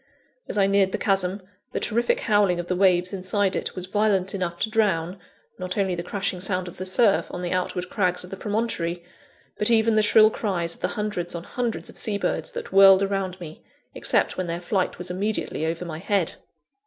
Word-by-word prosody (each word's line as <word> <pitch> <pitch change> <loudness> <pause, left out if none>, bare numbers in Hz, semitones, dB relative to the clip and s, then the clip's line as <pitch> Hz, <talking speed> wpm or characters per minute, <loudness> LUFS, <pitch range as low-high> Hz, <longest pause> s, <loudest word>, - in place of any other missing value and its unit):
As - - -3
I 195 - +4
neared 195 -1 +2
the - - 0
chasm, 195 -1 0 0.3
the - - -1
terrific 235 +2 0
howling 205 -5 +2
of 175 - -3
the 180 - -2
waves 180 0 +2
inside 195 +1 0
it - - -3
was 185 - -5
violent 195 -1 +1
enough 180 -3 -3
to 220 - 0
drown, 190 -4 0 0.4
not 180 +1 -4
only 195 -2 +1
the 175 - -3
crashing 190 +1 -3
sound 185 -1 0
of 175 - -10
the 185 - -6
surf 200 +2 +3
on 180 - -6
the 175 - -3
outward 180 0 -2
crags 180 -3 0
of 180 - -11
the - - -4
promontory, 195 -5 -2 0.6
but 210 - +7
even 225 -1 +4
the 215 - +4
shrill 215 +1 +6
cries 175 -7 -2
of - - -12
the - - +1
hundreds 205 -5 -3
on 170 - -5
hundreds 240 +2 -3
of - - -5
sea 210 -2 +1
birds - - -2
that - - -7
whirled 195 0 +7
around 195 -2 -2
me, 160 -3 -10 0.3
except - - 0
when 185 -1 -2
their 170 0 -3
flight 185 +1 -1
was 180 0 -5
immediately 190 -4 -1
over 170 +2 -3
my 160 -2 -6
head. 195 -2 0
190 Hz, 210 wpm, -24 LUFS, 180-205 Hz, 0.6 s, but